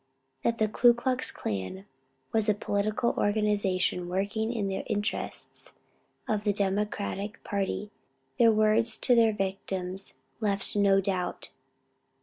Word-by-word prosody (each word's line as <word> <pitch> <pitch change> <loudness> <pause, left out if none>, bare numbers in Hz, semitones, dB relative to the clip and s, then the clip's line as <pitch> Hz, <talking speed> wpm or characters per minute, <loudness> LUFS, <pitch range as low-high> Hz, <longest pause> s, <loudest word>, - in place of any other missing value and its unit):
That 230 0 +1
the 220 - +2
Ku 240 +3 +5
Klux 255 +1 -1
Klan 95 -1 -4 0.5
was 220 -1 +2
a 210 - +4
political 210 +3 0
organization 205 -4 +1
working 205 +5 -1
in 215 -5 -1
the 190 - -2
interests 210 0 -3 0.5
of 210 -1 0
the 205 -1 +2
Democratic 200 +1 -2
party, 200 +1 -2 0.5
their 230 -1 +7
words 215 +1 +3
to 250 - +3
their 230 -2 +5
victims 195 -1 -3 0.2
left 200 -3 -1
no 200 -1 +4
doubt. 185 -2 -3
205 Hz, 125 wpm, -29 LUFS, 195-220 Hz, 0.5 s, their